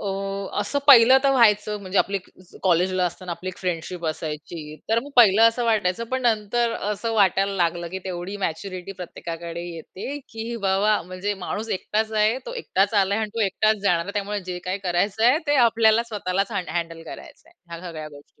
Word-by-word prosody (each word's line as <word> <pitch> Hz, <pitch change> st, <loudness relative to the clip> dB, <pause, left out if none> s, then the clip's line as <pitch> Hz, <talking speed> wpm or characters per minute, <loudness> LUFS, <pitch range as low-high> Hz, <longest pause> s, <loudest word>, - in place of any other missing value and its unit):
अ, -, -, -5 dB, 0.5 s
असं 205 Hz, +8 st, -1 dB
पहिलं 260 Hz, -1 st, +9 dB
तर 275 Hz, -, +5 dB
व्हायचं, 210 Hz, -4 st, +3 dB
म्हणजे 190 Hz, 0 st, -1 dB
आपली 200 Hz, -, +1 dB
अ, -, -, -18 dB, 0.2 s
एक 180 Hz, -, -17 dB
कॉलेजला 185 Hz, +1 st, +2 dB
असताना 175 Hz, +1 st, -6 dB
आपली 170 Hz, +2 st, -6 dB
एक 185 Hz, -, -7 dB
फ्रेंडशिप 175 Hz, -1 st, -4 dB
असायची, 155 Hz, 0 st, -5 dB
तर 225 Hz, +1 st, +3 dB
मग 285 Hz, -, -10 dB
पहिलं 220 Hz, -3 st, +7 dB
असं 235 Hz, +1 st, -2 dB
वाटायचं, 215 Hz, -2 st, +1 dB
पण 260 Hz, 0 st, 0 dB
नंतर 230 Hz, 0 st, +1 dB, 0.2 s
असं 225 Hz, +2 st, -2 dB
वाटायला 195 Hz, -1 st, +3 dB
लागलं, 170 Hz, -1 st, 0 dB
की 190 Hz, -, -4 dB
तेवढी 185 Hz, +1 st, -5 dB
मॅच्युरिटी 185 Hz, +3 st, -5 dB
प्रत्येकाकडे 170 Hz, -2 st, -7 dB
येते, 190 Hz, -, -7 dB
की 225 Hz, +1 st, -5 dB
बाबा 200 Hz, +2 st, +2 dB
म्हणजे 185 Hz, +3 st, -4 dB
माणूस 220 Hz, +2 st, -4 dB
एकटाच 220 Hz, +3 st, -2 dB
आहे, 215 Hz, +3 st, +2 dB
तो -, -, -5 dB
एकटाच 200 Hz, -, 0 dB
आला 200 Hz, -1 st, +3 dB
आहे 220 Hz, -, 0 dB
अन् 210 Hz, -, -8 dB
तो 230 Hz, -, -2 dB
एकटाचं 215 Hz, +3 st, +1 dB
जाणार 175 Hz, -4 st, +2 dB
आहे. 200 Hz, -, -6 dB
त्यामुळे 205 Hz, 0 st, -2 dB
जे 180 Hz, -1 st, -4 dB
काही 185 Hz, +2 st, -2 dB
करायचंय 205 Hz, -, +2 dB
ते 290 Hz, 0 st, +3 dB
आपल्याला 225 Hz, 0 st, +4 dB
स्वतःलाच 200 Hz, 0 st, -2 dB
हँड 185 Hz, -5 st, -3 dB
हँडल 165 Hz, -1 st, -4 dB
करायचंय 330 Hz, -, -12 dB, 0.2 s
ह्या 170 Hz, -, -7 dB
सगळ्या 155 Hz, -2 st, -7 dB
गोष्टी 145 Hz, -1 st, -17 dB
195 Hz, 190 wpm, -23 LUFS, 175-220 Hz, 0.5 s, पहिलं